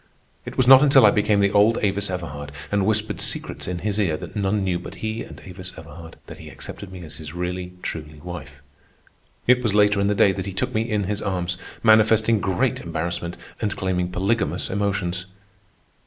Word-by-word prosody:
It - - -7
was 130 - +3
not 130 0 +10
until 135 -4 +6
I 105 - +7
became 105 -1 +2
the 100 0 +3
old 105 +3 +4
Avis 100 0 0
Everhard 75 -6 -5 0.2
and 100 -1 +1
whispered 110 0 0
secrets - - -2
in 90 0 -2
his 105 0 0
ear 85 -7 +1
that - - -9
none 100 0 0
knew 90 -2 0
but - - -9
he 110 +1 -4
and - - -9
Avis 90 0 -8
Everhard, 85 -1 -11
that - - -11
he - - -10
accepted 100 -2 -8
me 90 -2 -9
as 80 - -9
his 80 +1 -9
really, 90 0 -4
truly 75 -1 -6
wife. 75 -4 -9 0.8
It 125 0 +5
was 110 -4 0
later 105 -1 +4
in 100 - +2
the 105 - +1
day 100 - +5
that 95 0 -4
he 100 - -4
took 125 +6 -2
me 115 +1 0
in 105 -2 0
his 105 +2 -3
arms, 90 -2 -2 0.2
manifesting 110 0 +5
great 95 -1 0
embarrassment 85 +1 -4 0.2
and 105 -3 -1
claiming 90 -2 -1
polygamous 95 -2 -1
emotions. 95 -2 -1
95 Hz, 200 wpm, -23 LUFS, 90-105 Hz, 0.8 s, not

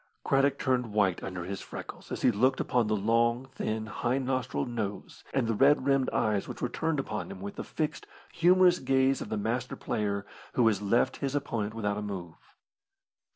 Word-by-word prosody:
Craddock 135 0 +3
turned 125 -6 0
white 100 -4 +2
under 90 -2 -5
his 95 +1 -5
freckles - - -9
as - - -4
he 125 - +6
looked 130 +5 +2
upon 120 -3 +1
the 110 - +1
long, 115 +4 +2
thin 110 -3 -2
high 120 +3 -1
nostrilled 130 -1 -1
nose 105 -4 -5
and 135 -3 +1
the 115 - 0
red 135 +4 +4
rimmed 135 -2 +3
eyes 105 -2 0
which - - -7
were 125 - -1
turned 160 +3 -1
upon 135 - -3
him 195 - -8
with 200 0 -6
the 230 - -4
fixed, 155 -2 -3 0.3
humorous 180 +1 +5
gaze 135 0 +2
of - - -5
the 110 - -1
master 120 +4 -2
player 100 -1 -2 0.3
who 125 - +3
has 105 -3 +2
left 105 +4 +2
his 140 0 -2
opponent 115 -7 -2
without 105 -2 -1
a - - -4
move. 90 -5 -8
120 Hz, 195 wpm, -29 LUFS, 105-135 Hz, 0.3 s, he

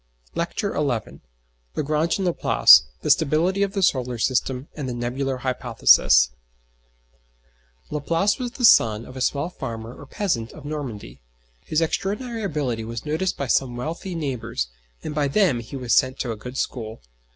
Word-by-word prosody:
LECTURE 170 +4 -2
XI 130 -7 -2 0.6
LAGRANGE 155 +3 0
AND 195 - -2
LAPLACE - - +6 0.2
THE - - +3
STABILITY 175 +7 +2
OF 200 -1 0
THE 195 -2 -1
SOLAR 125 -7 +1
SYSTEM, 130 +3 -1
AND 140 -4 -4
THE 120 - -4
NEBULAR 130 +3 -2
HYPOTHESIS 120 - +4 1.6
Laplace 165 - 0
was 245 -1 -4
the 250 -3 +1
son 115 - +5
of 130 - -12
a 130 - -6
small 145 +6 0
farmer 115 -5 -6
or 145 - -12
peasant 135 - -2
of 150 - -12
Normandy. 115 - -6 0.5
His 155 +1 +1
extraordinary 220 +8 -2
ability 145 - -2
was 115 +2 -6
noticed 160 +5 -1
by 140 - -2
some 125 -1 +1
wealthy 165 +7 -5
neighbours, 120 - -3 0.3
and 150 - -4
by 150 -1 +1
them 150 - +2
he 115 +4 -9
was 125 -3 -1
sent 130 +1 +3
to 120 - -2
a - - -3
good 125 +5 -8
school. 110 - -4
135 Hz, 160 wpm, -23 LUFS, 120-165 Hz, 1.6 s, LAPLACE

